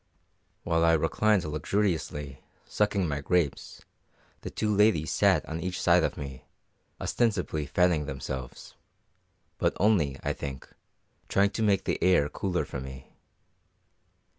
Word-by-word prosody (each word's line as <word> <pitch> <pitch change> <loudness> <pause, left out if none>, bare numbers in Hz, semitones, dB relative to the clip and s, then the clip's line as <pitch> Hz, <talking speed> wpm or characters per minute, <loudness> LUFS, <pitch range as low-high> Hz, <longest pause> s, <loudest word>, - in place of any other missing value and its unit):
While 80 -1 +1
I 85 0 +5
reclined 90 +5 +2
luxuriously, 75 -3 -2 0.2
sucking 100 -3 0
my 70 -2 -2
grapes, 80 -1 -1 0.6
the - - -6
two 105 -1 -1
ladies 100 -7 +3
sat - - +3
on 80 +1 -5
each 90 +2 -3
side 85 -1 +4
of 75 - -1
me, 70 -2 -7 0.6
ostensibly 90 - -1
fanning 85 -3 +2
themselves, 65 -2 -6 0.9
but - - 0
only, 85 -10 +2
I - - 0
think, 70 -2 -7 0.6
trying 100 +1 +2
to 110 - -4
make 100 -3 +2
the - - -2
air 90 -6 +4
cooler 90 +1 -2
for 70 - -6
me. 65 0 -10
80 Hz, 130 wpm, -28 LUFS, 70-95 Hz, 0.9 s, I